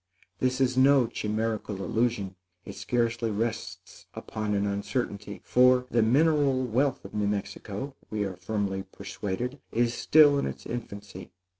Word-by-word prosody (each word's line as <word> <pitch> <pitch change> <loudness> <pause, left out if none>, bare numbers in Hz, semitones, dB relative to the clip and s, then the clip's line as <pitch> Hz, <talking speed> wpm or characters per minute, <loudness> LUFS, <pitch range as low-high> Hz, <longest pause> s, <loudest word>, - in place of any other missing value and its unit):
This 130 0 +1
is 130 -1 +2
no 135 0 +5
chimerical 110 -3 -2
illusion; 105 -2 -1 0.3
it 100 - -7
scarcely 115 +1 -1
rests 110 +2 -4
upon 105 -1 -3
an 100 0 +1
uncertainty; 100 0 -3
for, 125 0 +4
the 120 - +3
mineral 140 +2 +3
wealth 130 +2 0
of 95 - -10
New 105 -1 0
Mexico, 100 +6 -4
we 105 -1 -1
are 95 -2 -4
firmly 95 +1 -2
persuaded, 105 +6 -5
is 120 +1 +1
still 145 0 +5
in - - -1
its - - -7
infancy. 100 -5 -7
115 Hz, 140 wpm, -28 LUFS, 100-125 Hz, 0.3 s, no